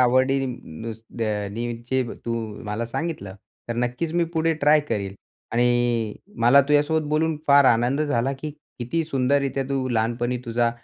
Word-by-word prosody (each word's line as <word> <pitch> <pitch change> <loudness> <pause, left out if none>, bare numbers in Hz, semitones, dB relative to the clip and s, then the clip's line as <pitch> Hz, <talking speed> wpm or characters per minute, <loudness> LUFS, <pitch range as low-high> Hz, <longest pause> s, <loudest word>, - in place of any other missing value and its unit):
आवडी 130 +2 +4
नुस 115 -1 -7 0.2
दे 115 - 0 0.2
अ, - - -4
नि 120 +3 -3
चे 130 0 +2 0.2
तू 115 0 -1 0.3
मला 105 +2 -3
सांगितलं, 115 - -4 0.3
तर 120 - -2
नक्कीच 125 +7 -1
मी 175 -1 +3
पुढे 165 0 +2
ट्राय 150 +1 +6
करीन. 100 -2 -2 0.4
आणि 120 -2 +2 0.3
मला 130 +4 +7
तुझ्यासोबत 150 +1 +2
बोलून 155 +1 +1
फार 140 0 +7
आनंद 120 +3 +3
झाला, 135 -3 +1
की 145 +3 -5 0.3
किती 125 +7 -1
सुंदररीत्या 135 -1 +1
तू 135 -2 -1
लहानपणी 120 +1 0
तुझा 120 0 +1
125 Hz, 155 wpm, -24 LUFS, 115-145 Hz, 0.4 s, मला